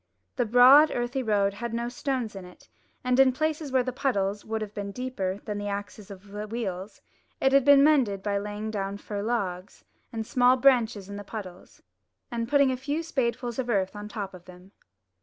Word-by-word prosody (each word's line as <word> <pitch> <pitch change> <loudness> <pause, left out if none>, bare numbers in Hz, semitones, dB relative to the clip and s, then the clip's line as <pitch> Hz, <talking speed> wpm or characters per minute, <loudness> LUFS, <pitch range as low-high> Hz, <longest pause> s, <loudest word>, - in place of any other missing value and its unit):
The 245 -3 0
broad 255 +7 +7
earthy 245 +1 -2
road 205 -4 +1
had 235 +2 -5
no 235 0 -2
stones 245 -3 -3
in 195 - -7
it; 180 0 -15 0.4
and 250 0 +1
in 265 -1 +6
places 310 +1 -2
where 260 -1 +3
the 255 0 -4
puddles 205 -6 -1
would 220 0 -3
have 210 -1 -8
been 200 -1 -5
deeper 200 -6 -3
than 210 -2 -4
the 205 - -4
axles 205 0 -6
of 200 0 -12
the 210 +1 -6
wheels, 205 -3 -5 0.4
it 270 - +3
had 275 0 +5
been 280 0 +7
mended 250 -11 +3
by 200 -1 0
laying 210 +1 -5
down 200 -1 -3
fir 205 0 -5
logs 200 -5 -3 0.3
and 225 -1 -4
small 250 +1 +4
branches 240 -7 +3
in 200 0 -7
the 205 - -7
puddles, 190 -5 -10 0.5
and 230 -1 -3
putting 280 -1 +4
a 255 - -2
few 290 +5 -3
spadefuls 245 -5 -2
of 245 -2 -2
earth 195 -3 0
on 205 0 -7
the - - -14
top 200 -3 -4
of 180 -1 -13
them. 180 +1 -15
220 Hz, 205 wpm, -27 LUFS, 200-255 Hz, 0.5 s, broad